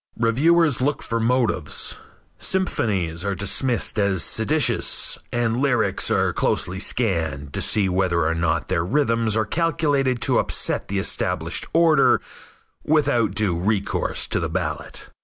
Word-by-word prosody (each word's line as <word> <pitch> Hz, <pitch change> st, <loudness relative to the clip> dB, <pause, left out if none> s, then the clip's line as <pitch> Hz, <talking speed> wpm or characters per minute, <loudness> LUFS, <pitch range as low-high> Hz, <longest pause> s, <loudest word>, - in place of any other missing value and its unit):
Reviewers 145 Hz, +6 st, +2 dB
look 145 Hz, +2 st, -1 dB
for 115 Hz, -, -2 dB
motives. 120 Hz, 0 st, 0 dB, 0.4 s
Symphonies 95 Hz, -, -1 dB
are 100 Hz, -1 st, -2 dB
dismissed 110 Hz, +5 st, 0 dB
as 100 Hz, -3 st, +1 dB
seditious, 145 Hz, +7 st, +1 dB
and 120 Hz, -1 st, 0 dB
lyrics 125 Hz, -5 st, +1 dB
are -, -, +1 dB
closely 90 Hz, +2 st, -1 dB
scanned 80 Hz, -, -1 dB
to -, -, -2 dB
see 105 Hz, -3 st, +2 dB
whether 90 Hz, -3 st, +1 dB
or 80 Hz, -, +1 dB
not 85 Hz, -1 st, -1 dB
their 85 Hz, -, 0 dB
rhythms 115 Hz, -1 st, +1 dB
are 110 Hz, -, +1 dB
calculated 145 Hz, -3 st, 0 dB
to -, -, +3 dB
upset -, -, 0 dB
the 100 Hz, -, -3 dB
established 95 Hz, -, -1 dB
order 165 Hz, -3 st, +4 dB, 0.6 s
without 120 Hz, -, +1 dB
due 105 Hz, -5 st, 0 dB
recourse 100 Hz, +3 st, -1 dB
to -, -, -1 dB
the -, -, -2 dB
ballot. -, -, -4 dB
110 Hz, 135 wpm, -22 LUFS, 95-135 Hz, 0.6 s, order